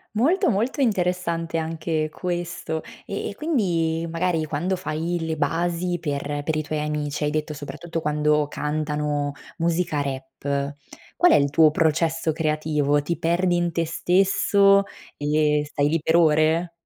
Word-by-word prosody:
Molto, 340 Hz, -, +3 dB
molto 230 Hz, +8 st, -1 dB
interessante 180 Hz, -7 st, 0 dB
anche 160 Hz, -1 st, -2 dB
questo. 175 Hz, -2 st, -4 dB, 0.2 s
Eh, -, -, -3 dB
e -, -, -6 dB
quindi 170 Hz, -, 0 dB
magari 165 Hz, -1 st, 0 dB
quando 160 Hz, +6 st, -1 dB
fai 170 Hz, -1 st, -2 dB
le 160 Hz, -1 st, -2 dB
basi 170 Hz, +4 st, 0 dB
per 145 Hz, -2 st, -3 dB
per 160 Hz, +1 st, -1 dB
i 155 Hz, -, 0 dB
tuoi 155 Hz, 0 st, -3 dB
amici 150 Hz, -1 st, -2 dB
hai 150 Hz, -, +1 dB
detto 150 Hz, 0 st, -2 dB
soprattutto 165 Hz, +4 st, -5 dB
quando 150 Hz, -1 st, +1 dB
cantano 150 Hz, -1 st, -2 dB, 0.3 s
musica 165 Hz, -3 st, 0 dB
rap, 140 Hz, +1 st, -3 dB, 0.4 s
qual 355 Hz, 0 st, +5 dB
è -, -, +7 dB
il 140 Hz, 0 st, +3 dB
tuo 155 Hz, +2 st, +5 dB
processo 160 Hz, +1 st, +1 dB
creativo? 150 Hz, -2 st, +1 dB
Ti 170 Hz, +3 st, -2 dB
perdi 175 Hz, +2 st, +1 dB
in 175 Hz, 0 st, 0 dB
te 165 Hz, 0 st, -1 dB
stesso 195 Hz, +3 st, +3 dB, 0.3 s
e 150 Hz, 0 st, +2 dB
stai 145 Hz, 0 st, 0 dB
lì 165 Hz, +1 st, +1 dB
per 160 Hz, +2 st, +1 dB
ore? 160 Hz, +1 st, +3 dB
160 Hz, 145 wpm, -24 LUFS, 150-175 Hz, 0.4 s, è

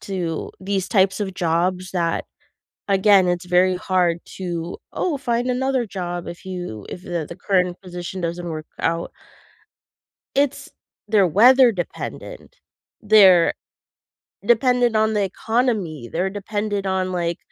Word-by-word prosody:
to 175 Hz, -5 st, -4 dB
these 190 Hz, -1 st, -2 dB
types 195 Hz, -1 st, +2 dB
of 190 Hz, -2 st, -3 dB
jobs 180 Hz, +2 st, 0 dB
that, 170 Hz, -2 st, -1 dB, 0.6 s
again, 195 Hz, -1 st, +5 dB
it's 175 Hz, +1 st, -1 dB
very 180 Hz, +1 st, +3 dB
hard 180 Hz, -2 st, +1 dB, 0.2 s
to, 175 Hz, -2 st, -4 dB
"Oh, 340 Hz, -5 st, -1 dB
find 245 Hz, -1 st, -1 dB
another 255 Hz, -1 st, 0 dB
job 175 Hz, -3 st, -5 dB
if 170 Hz, -, -9 dB
you 180 Hz, -, -6 dB
if 180 Hz, -, -8 dB
the 170 Hz, -4 st, -3 dB
the 170 Hz, -, -8 dB
current 180 Hz, -2 st, 0 dB
position 180 Hz, 0 st, -7 dB
doesn't 170 Hz, +1 st, -3 dB
work 155 Hz, -1 st, -6 dB
out." 165 Hz, +1 st, -1 dB, 1.2 s
It's 280 Hz, -1 st, 0 dB, 0.4 s
they're 205 Hz, -4 st, +4 dB
weather-dependent. 240 Hz, -, +2 dB, 0.5 s
They're 195 Hz, -5 st, +6 dB, 0.9 s
dependent 240 Hz, -1 st, +3 dB
on 220 Hz, 0 st, +2 dB
the 210 Hz, -, +1 dB
economy, 195 Hz, -, -1 dB
they're 185 Hz, +3 st, 0 dB
dependent 205 Hz, 0 st, -3 dB
on, 185 Hz, -1 st, -1 dB
like, 170 Hz, -1 st, -2 dB
185 Hz, 125 wpm, -21 LUFS, 175-215 Hz, 1.2 s, They're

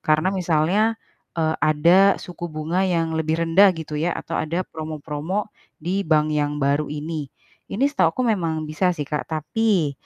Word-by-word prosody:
karena 155 Hz, +5 st, +2 dB
misalnya, 185 Hz, +5 st, +1 dB, 0.4 s
eee, 160 Hz, -1 st, +1 dB
ada 170 Hz, +6 st, +5 dB
suku 175 Hz, -1 st, -7 dB
bunga 155 Hz, +4 st, -2 dB
yang 165 Hz, -2 st, 0 dB
lebih 160 Hz, 0 st, 0 dB
rendah 190 Hz, +5 st, +6 dB
gitu 150 Hz, -2 st, -5 dB
ya, 170 Hz, +1 st, 0 dB
atau 165 Hz, -, -8 dB
ada 170 Hz, +4 st, -2 dB
promo-promo 155 Hz, +5 st, -4 dB, 0.2 s
di 180 Hz, +5 st, -2 dB
bank 155 Hz, -1 st, +3 dB
yang 150 Hz, 0 st, 0 dB
baru 145 Hz, +1 st, +1 dB
ini. 150 Hz, 0 st, -4 dB, 0.4 s
Ini 230 Hz, +7 st, 0 dB
setahuku 280 Hz, -2 st, +1 dB
memang 160 Hz, -5 st, -2 dB
bisa 155 Hz, +5 st, 0 dB
sih, 145 Hz, -, -3 dB
Kak. 150 Hz, 0 st, -4 dB
Tapi, 165 Hz, +1 st, 0 dB
160 Hz, 155 wpm, -22 LUFS, 155-185 Hz, 0.4 s, rendah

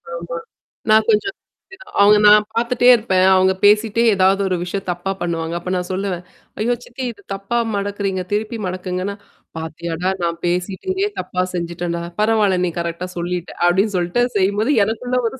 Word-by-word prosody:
ஆமா. 170 Hz, 0 st, -5 dB, 0.5 s
நான் 220 Hz, 0 st, +5 dB
கொஞ்சம். 225 Hz, -, +2 dB, 0.7 s
அவங்க 210 Hz, +1 st, +7 dB
நான் 210 Hz, 0 st, +7 dB
பார்த்துட்டே 240 Hz, +1 st, +1 dB
இருப்பேன். 190 Hz, -5 st, +2 dB
அவங்க 190 Hz, 0 st, +4 dB
பேசிட்டே 215 Hz, +2 st, +4 dB
ஏதாவது 190 Hz, +1 st, +3 dB
ஒரு 185 Hz, -, 0 dB
விஷயம் 190 Hz, +2 st, -5 dB
தப்பா 175 Hz, +2 st, -3 dB
பண்ணுவாங்க. 165 Hz, -1 st, -2 dB
அப்ப 180 Hz, +1 st, -5 dB
நான் 180 Hz, 0 st, -3 dB
சொல்லுவேன். 185 Hz, -2 st, -3 dB, 0.4 s
ஐயோ! 240 Hz, +3 st, +1 dB
சித்தி 255 Hz, +2 st, -7 dB
இது 200 Hz, -3 st, -17 dB
தப்பா 195 Hz, +5 st, -3 dB, 0.2 s
மடக்குறீங்க. 200 Hz, -2 st, -2 dB
திருப்பி 220 Hz, +3 st, -1 dB
மடக்குங்கன்னா, 185 Hz, +2 st, -3 dB, 0.4 s
"பார்த்தியாடா! 165 Hz, +2 st, -3 dB
நான் 170 Hz, 0 st, -1 dB
பேசிட்டு 180 Hz, -, -2 dB
இங்கே 395 Hz, +2 st, 0 dB
தப்பா 185 Hz, 0 st, -2 dB
செஞ்சுட்டேன்டா! 170 Hz, 0 st, -3 dB, 0.2 s
பரவால்ல 215 Hz, -3 st, +3 dB
நீ 175 Hz, -, -1 dB
கரெக்ட்டா 170 Hz, +1 st, -3 dB
சொல்லிட்ட." 175 Hz, 0 st, -3 dB
அப்ப்டின்னு 195 Hz, +4 st, +2 dB
சொல்லிட்டுசெய்யும்போது 205 Hz, +4 st, +1 dB
எனக்குள்ள 245 Hz, +4 st, -1 dB
ஒரு 265 Hz, -, -11 dB
190 Hz, 150 wpm, -19 LUFS, 175-215 Hz, 0.7 s, அவங்க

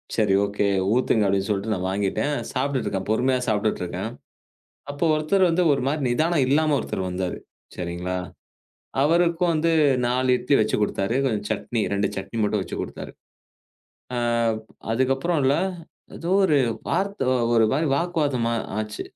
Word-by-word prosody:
சரி 105 Hz, -3 st, +2 dB
ஓகே 100 Hz, 0 st, -1 dB, 0.3 s
ஊத்துங்க 115 Hz, -4 st, +2 dB
அப்படின்னு 100 Hz, +1 st, 0 dB
சொல்லிட்டு 105 Hz, +2 st, 0 dB
நான் 95 Hz, 0 st, -3 dB
வாங்கிட்டேன். 105 Hz, +9 st, -1 dB, 0.2 s
சாப்பிட்டுட்டு 135 Hz, 0 st, -1 dB
இருக்கேன். 95 Hz, -1 st, -3 dB
பொறுமையா 130 Hz, +3 st, +2 dB
சாப்பிட்டுட்டு 110 Hz, -2 st, 0 dB
இருக்கேன். 90 Hz, -, -4 dB, 0.8 s
அப்ப 145 Hz, +4 st, -4 dB
ஒருத்தர் 180 Hz, +5 st, +2 dB
வந்து 180 Hz, +2 st, +2 dB
ஒரு 135 Hz, -, -1 dB
மாதிரி 150 Hz, +2 st, -1 dB
நிதானம் 155 Hz, +3 st, +2 dB
இல்லாம 150 Hz, +2 st, +3 dB
ஒருத்தர் 95 Hz, -1 st, -3 dB
வந்தாரு. 90 Hz, 0 st, -3 dB, 0.4 s
சரிங்களா? 90 Hz, +1 st, -3 dB, 0.9 s
அவருக்கு 170 Hz, +3 st, +2 dB
வந்து 165 Hz, +1 st, +1 dB, 0.4 s
4 125 Hz, +1 st, +2 dB
இட்லி 140 Hz, -, +1 dB
வச்சு 110 Hz, -, +1 dB
கொடுத்தாரு. 100 Hz, +1 st, 0 dB
கொஞ்சம் 105 Hz, -5 st, -1 dB
சட்னி. 115 Hz, -2 st, -1 dB
2 100 Hz, 0 st, +1 dB
சட்னி 95 Hz, +4 st, -5 dB
மட்டும் 105 Hz, -1 st, +1 dB
வச்சு -, -, -6 dB
கொடுத்தாரு. -, -, -7 dB, 1.8 s
அதுக்கப்புறம் 135 Hz, +7 st, +1 dB
இல்ல. 135 Hz, +2 st, +4 dB, 0.6 s
ஏதோ 170 Hz, +2 st, -4 dB
ஒரு 155 Hz, -6 st, +3 dB, 0.3 s
வார்த்த 200 Hz, -6 st, -1 dB, 0.3 s
ஒரு 115 Hz, -, +5 dB
மாதிரி 155 Hz, +3 st, +1 dB
வாக்குவாதமா 145 Hz, -8 st, 0 dB, 0.3 s
ஆச்சு. 105 Hz, -1 st, -4 dB
125 Hz, 140 wpm, -24 LUFS, 100-155 Hz, 1.8 s, ஒரு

